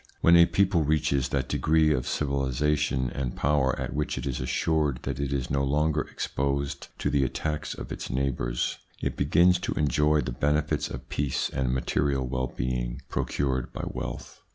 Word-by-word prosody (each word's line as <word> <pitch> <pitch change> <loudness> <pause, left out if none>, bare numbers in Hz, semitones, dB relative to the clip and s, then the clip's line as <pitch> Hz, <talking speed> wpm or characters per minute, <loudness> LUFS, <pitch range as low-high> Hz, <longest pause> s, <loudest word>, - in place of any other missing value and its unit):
When 85 - +6
a 85 0 +8
people 95 -4 +2
reaches 75 -3 +1
that 70 -2 -1
degree 80 -1 +3
of 65 -4 -2
civilisation 70 -1 0
and 65 -3 -3
power 70 -3 +1
at - - -3
which 75 +1 -2
it - - -4
is 65 -3 -2
assured 75 +1 +1
that 65 0 -3
it 70 -1 -1
is 65 -3 -2
no 70 0 +1
longer 75 +2 +1
exposed 70 +1 -2
to - - -1
the 70 -1 +3
attacks 75 +3 -2
of - - -8
its - - -5
neighbours, 65 -2 -1 0.2
it - - -2
begins 85 +5 +4
to - - -2
enjoy 75 +1 +2
the 65 - -3
benefits 75 +4 0
of 65 0 -7
peace 70 -2 -1
and 65 -2 0
material 65 +1 0
well 65 +1 -1
being - - -3
procured 65 -3 -1
by - - -5
wealth. - - -6
70 Hz, 175 wpm, -27 LUFS, 65-75 Hz, 0.2 s, a